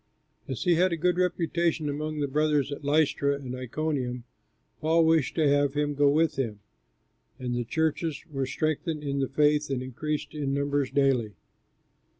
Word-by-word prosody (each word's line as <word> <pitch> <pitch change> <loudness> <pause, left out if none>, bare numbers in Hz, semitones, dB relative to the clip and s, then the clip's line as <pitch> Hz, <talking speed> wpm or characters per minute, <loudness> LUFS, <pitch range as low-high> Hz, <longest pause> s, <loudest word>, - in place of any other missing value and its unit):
As 130 - -4
he 175 - +4
had 180 +2 +3
a 170 - -1
good 180 +2 +1
reputation 170 -3 0
among 150 +1 -3
the 145 - +1
brothers 150 -1 +1
at 140 - -6
Lystra 145 -1 +2
and 135 -3 -6
Iconium, 130 -1 -3 0.6
Paul 160 +1 +3
wished 160 -4 +2
to 155 -3 +3
have 145 0 +2
him 145 0 0
go 145 0 +4
with 155 +2 +2
him. 115 -6 -2 0.8
And 125 -2 -3
the 120 0 -1
churches 160 +4 -1
were 135 -2 -2
strengthened 155 +2 -2
in 140 -1 -2
the 135 - 0
faith 150 +1 +2
and 130 -2 -2
increased 150 +4 -4
in 140 -2 -2
numbers 140 -1 0
daily. 130 -6 +1
145 Hz, 165 wpm, -27 LUFS, 135-155 Hz, 0.8 s, he